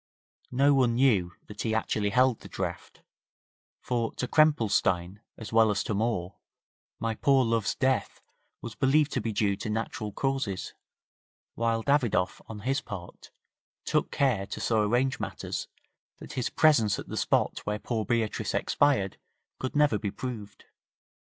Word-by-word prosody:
No 140 +3 +4
one 125 -4 +3
knew 105 -10 +3
that 105 0 -8
he 110 -1 0
actually 105 -2 0
held 125 +1 +3
the - - -11
draft, - - -5 0.8
for 115 -2 -1
to 125 - -2
Krempelstein, 105 - +2 0.2
as 110 -1 -8
well 110 -1 +5
as 100 -2 0
to - - -2
Moore, 100 -4 -1 0.6
my 115 0 -1
poor 135 +2 +3
love's 115 -2 0
death 130 -1 0 0.4
was 115 - -6
believed 145 +2 +2
to 125 - -1
be 110 +1 -2
due 100 -1 +1
to 110 - -5
natural 110 -1 -3
causes, 135 -6 -2 0.8
while 115 -1 0
Davidoff, 125 -10 +1
on 105 -2 -8
his 135 +7 0
part, 90 -3 -9 0.6
took - - +1
care 120 -9 +1
to - - -6
so 110 -2 +1
arrange 125 +5 +1
matters, - - -4 0.5
that - - -10
his 125 - -1
presence 125 -10 +4
at - - -7
the - - -6
spot - - +1
where 105 0 0
poor 110 0 -2
Beatrice 115 0 -1
expired 130 -10 +1 0.4
could 130 - -4
never 145 -8 +3
be 105 - -2
proved. 105 -2 -7
115 Hz, 150 wpm, -28 LUFS, 105-130 Hz, 0.8 s, well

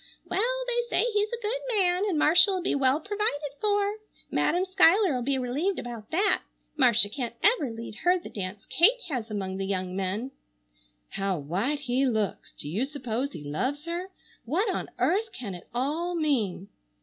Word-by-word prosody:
Well, - - 0
they 480 -1 +1
say 485 0 +2
he's 415 0 +1
a 475 0 -4
good 485 +4 -1 0.2
man 365 0 +3
and 345 - 0
Marcia'll 350 +4 +5
be - - +1
well 270 +1 +2
provided 330 -7 -2
for. 410 0 +1 0.3
Madam 360 +2 +2
Schuyler'll 370 - +4
be 270 +2 0
relieved 285 +10 -1
about 235 -3 -7
that. 390 +5 +2 0.3
Marcia 240 -7 +5
can't 235 +1 -5
ever 415 - +4
lead 225 -1 -8
her 360 +1 +3
the 350 - -9
dance 195 0 -6
Kate 465 +9 +4
has 245 -6 -3
among 190 -3 -3
the 195 0 -3
young 185 -2 -2
men. 195 +7 -2 0.8
How 195 -2 -1
white 195 - -1
he 265 0 +1
looks! 220 -5 -2
Do - - -7
you 200 - -1
suppose 270 -1 -3
he 150 - -8
loves 255 - -2
her? 345 +3 -4 0.3
What 360 - 0
on - - -4
earth 430 +4 +1
can 215 -6 -6
it 175 - -10
all 305 +8 -1
mean? 230 - 0
285 Hz, 175 wpm, -27 LUFS, 220-370 Hz, 0.8 s, Marcia'll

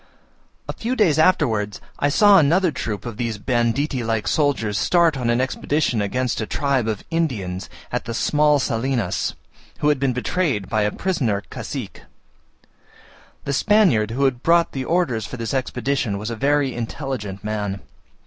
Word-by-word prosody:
A - - -3
few 240 +3 -3
days 170 - +3
afterwards 115 - +2 0.2
I 145 - +2
saw 205 +5 +6
another 170 +4 +3
troop 105 -7 -4
of 115 -3 -6
these 115 -3 -2
banditti 125 +4 0
like 110 -1 -1
soldiers 135 -9 +1
start 170 -3 +3
on 125 -3 -1
an 120 +1 +2
expedition 130 -2 0
against 125 +4 -1
a 110 - -3
tribe 140 -5 0
of 110 -3 -3
Indians 105 - -2 0.2
at - - -2
the 115 - -4
small 150 +2 +3
Salinas, 125 -2 -1 0.4
who 150 - +1
had 145 -2 +2
been 135 -1 +1
betrayed 125 - -1
by 110 - 0
a 105 0 +1
prisoner 120 - -1
cacique. - - -6 1.4
The 140 - -2
Spaniard 175 - +3
who 135 +4 +2
brought 165 +7 +2
the 130 -1 -4
orders 140 - 0
for 125 - -7
this 115 +1 -4
expedition 130 -4 -1
was 105 +3 -4
a - - -3
very 140 +1 +1
intelligent 115 -5 -5
man. 105 -2 -3
130 Hz, 160 wpm, -22 LUFS, 110-150 Hz, 1.4 s, saw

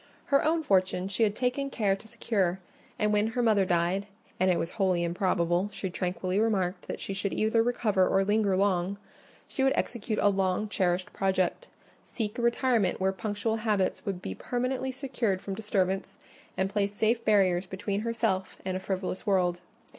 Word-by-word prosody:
Her 275 - +5
own 320 +1 +2
fortune 185 -4 +1
she 200 +3 -2
had 210 -2 +3
taken 255 +3 -1
care 205 -7 +1
to 195 - -14
secure; 190 -5 0 0.4
and 210 0 +1
when 210 +1 +3
her 245 - +2
mother 210 -4 +4
died—and 185 +2 -1
it 180 - +3
was 165 - -2
wholly 185 -5 +1
improbable, 175 +1 +1
she 190 -3 -4
tranquilly 185 +2 -1
remarked, 195 -5 0
that - - -4
she 195 - -4
should 195 0 -2
either 220 +1 +2
recover 215 -5 +2
or 195 - +3
linger 205 -1 +2
long—she 200 +6 -2
would 270 - +4
execute 225 -2 -2
a 205 - +4
long 195 +1 0
cherished 185 -3 0
project: 190 - 0 0.4
seek 215 -1 -4
a - - 0
retirement 235 -4 +2
where 190 0 +2
punctual 205 +4 -2
habits 210 -4 0
would 195 -5 -4
be 95 - -3
permanently 255 - -2
secured 250 -7 -1
from 195 - -5
disturbance, 195 -2 -1 0.4
and 190 +1 0
place 200 0 0
safe 225 +2 +1
barriers 190 -3 +3
between 200 +2 -3
herself 225 -5 -1
and 185 -1 -1
a - - -1
frivolous 190 +1 -4
world. 180 -3 +2
200 Hz, 170 wpm, -28 LUFS, 185-220 Hz, 0.4 s, Her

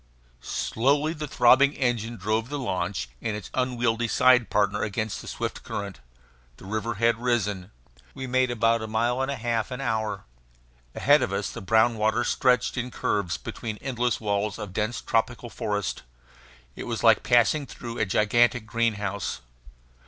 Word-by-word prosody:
Slowly 140 - 0
the 150 -2 -5
throbbing 135 +2 +5
engine 120 -3 -1
drove 110 +5 -1
the 145 - -3
launch 90 - -2
and 110 - -2
its 105 - -10
unwieldy 120 -2 0
side 125 -1 +4
partner 105 0 +1
against 110 0 -2
the - - -11
swift - - -4
current. 100 -1 -6 0.6
The - - -13
river 110 +3 -3
had 115 +2 +1
risen. 105 -6 -1 0.5
We 130 - -5
made 130 0 +2
about 115 -1 +2
a 110 - -4
mile 120 +4 0
and 135 - -1
a 140 - -1
half 115 -2 -1
an 125 - -5
hour. 110 -6 -2 0.7
Ahead 145 0 +4
of 95 - -1
us 100 0 -2
the - - -7
brown 110 +3 +3
water 110 +3 +2
street - - 0
stretched 125 0 +2
in 125 0 -2
curves 100 -6 -1
between 110 -2 -6
endless 125 -2 -1
walls 105 -1 -1
of 105 -4 -7
dense 110 +4 -2
tropical 120 +1 -1
forest. 105 -2 -2 0.7
It - - -7
was - - -3
like - - +6
passing 125 +4 +3
through 120 0 -7
a - - +2
gigantic 115 +4 +2
greenhouse. 105 -4 -2
115 Hz, 165 wpm, -26 LUFS, 105-125 Hz, 0.7 s, like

